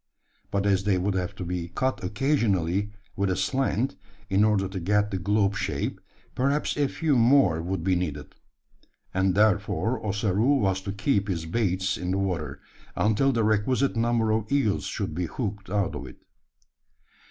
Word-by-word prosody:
But 100 -1 -1
as 95 -1 +2
they 100 -3 +3
would 95 +2 0
have 95 +1 -2
to 90 - -5
be 85 0 -3
cut 130 +7 -2
occasionally 100 - +1 0.3
with 100 0 0
a 95 - +1
slant, 130 +4 0 0.4
in 95 +2 +4
order 105 -3 +2
to 95 0 -5
get 105 +4 +1
the 95 - -2
globe 100 +1 +1
shape, 100 - -3 0.3
perhaps 140 +3 0
a 145 -1 +2
few 155 +1 0
more 115 - +4
would 90 0 -3
be 95 0 +2
needed; 75 -5 -4 0.8
and 95 0 +1
therefore 110 +3 +1
Ossaroo 105 +5 +1
was 95 -5 +1
to 100 - -4
keep 100 0 0
his 85 -5 -2
baits 95 0 0
in 90 - -3
the 95 - +1
water, 80 -8 -2 0.3
until 110 +6 +2
the 115 -3 +1
requisite 110 +6 +1
number 115 -1 +1
of 110 +2 -1
eels 135 -8 +1
should - - -3
be 90 +1 -2
hooked 100 0 -5
out 100 -1 0
of - - -6
it. - - -12
100 Hz, 170 wpm, -26 LUFS, 95-115 Hz, 0.8 s, in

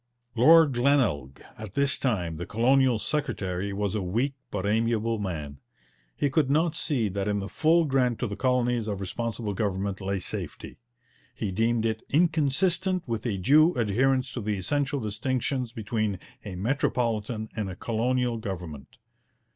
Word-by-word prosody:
Lord 150 +5 +6
Glenelg, 120 - +1 0.2
at 110 -3 -8
this 140 0 +2
time 90 - -1
the 85 - -6
colonial 130 +2 +3
secretary, 100 -9 -2
was 100 0 -2
a 105 - -1
weak 115 +10 -1 0.2
but 100 -1 -3
amiable 115 +1 +1
man. 75 -8 -5 0.6
He 145 - +1
could 140 -1 +2
not 155 +3 +2
see 130 -9 +1
that 100 +1 -3
in 105 0 0
the 100 -1 -3
full 160 +7 +3
grant 130 -4 +1
to - - -2
the 100 -3 -4
colonies 125 -2 +1
of 100 -2 -3
Responsible 110 +2 -3
Government 100 -1 -2
lay 100 +1 -1
safety; 90 - -6 0.6
he 100 - -3
deemed 115 +3 +1
it 110 -1 -1
'inconsistent 170 +4 +1
with 115 +1 -2
a 105 -4 -1
due 155 - +5
adherence 125 +3 +1
to 120 - -4
the 105 -1 -1
essential 145 - 0
distinctions 125 +3 -2
between 110 -2 -2 0.3
a 100 -4 -6
Metropolitan 110 0 -1
and 105 -3 -2
a 90 - -6
Colonial 120 +3 0
Government. 85 -9 -7
115 Hz, 155 wpm, -27 LUFS, 100-135 Hz, 0.6 s, Lord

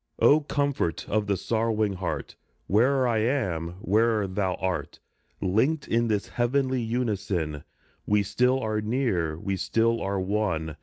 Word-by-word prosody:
Oh, 150 - +6
comfort 140 - -1
of 105 -1 0
the 100 -1 +1
sorrowing 110 0 0
heart! 95 -1 -4 0.3
Where'er 130 +6 +3
I 115 -2 +1
am, 95 - -1
where'er 110 +1 +2
thou 95 -1 -1
art, 95 -1 -3 0.4
Linked 120 - +1
in 120 +1 +1
this 105 -3 -1
heavenly 130 +1 0
unison 100 - -2 0.4
We 105 0 +3
still 125 +6 +2
are 110 -2 -1
near, 105 - 0
we 95 +3 -3
still 115 +4 +1
are 100 0 -1
one 95 -6 -1
105 Hz, 140 wpm, -26 LUFS, 95-120 Hz, 0.4 s, Oh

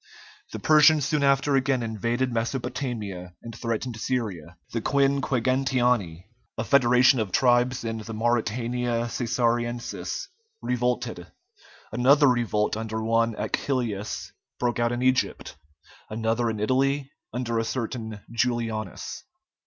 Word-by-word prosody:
The - - -5
Persians 155 -1 +5
soon 150 0 0
after 140 0 +3
again 130 -2 +1
invaded 115 +3 -1
Mesopotamia 115 -6 -3
and 115 -1 -8
threatened 115 0 -3
Syria; 95 -10 -3 0.2
the 115 - -1
Quinquegentiani, 130 -8 +1 0.3
a 115 - -1
federation 125 0 +5
of 105 -4 -2
tribes 125 +2 +3
in 115 -1 -3
the 110 +1 -7
Mauritania 120 +1 0
Cæsariensis, 120 - -1 0.3
revolted; 125 -6 -2 0.6
another 135 +6 +5
revolt 115 -5 +1
under 110 0 -3
one 115 0 +2
Achillæus 115 -6 -2 0.3
broke 120 -1 -1
out 120 0 +2
in 120 +1 -2
Egypt; 130 - 0 0.5
another 115 +2 0
in 110 -1 -3
Italy 135 +5 +1 0.2
under 120 -1 -1
a - - +1
certain 115 -3 -4
Julianus. 115 -5 -2
120 Hz, 115 wpm, -26 LUFS, 110-130 Hz, 0.6 s, Persians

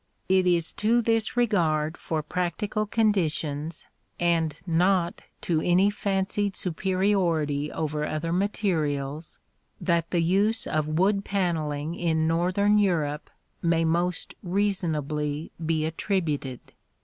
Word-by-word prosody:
] - - -42
It 185 -1 +2
is 170 -2 +1
to 225 +3 +4
this 225 0 +1
regard 165 -9 +2
for 160 -3 -3
practical 180 +6 -2
conditions, 165 -8 0 0.3
and 165 -3 +1
not 175 +2 +1 0.2
to 160 -3 0
any 185 +4 +3
fancied 200 0 -1
superiority 175 -5 0
over 150 -1 -2
other 160 +2 -2
materials, 160 -7 -1 0.4
that 170 -2 0
the 170 -2 +1
use 200 +6 +2
of 155 -1 -1
wood 200 +2 +2
panelling 160 -6 -1
in 160 -2 0
northern 185 +5 +2
Europe 155 -7 0 0.3
may 165 -1 +2
most 170 +2 0
reasonably 160 -6 -1
be 160 -1 0
attributed. 160 - -2
170 Hz, 115 wpm, -26 LUFS, 155-195 Hz, 0.4 s, to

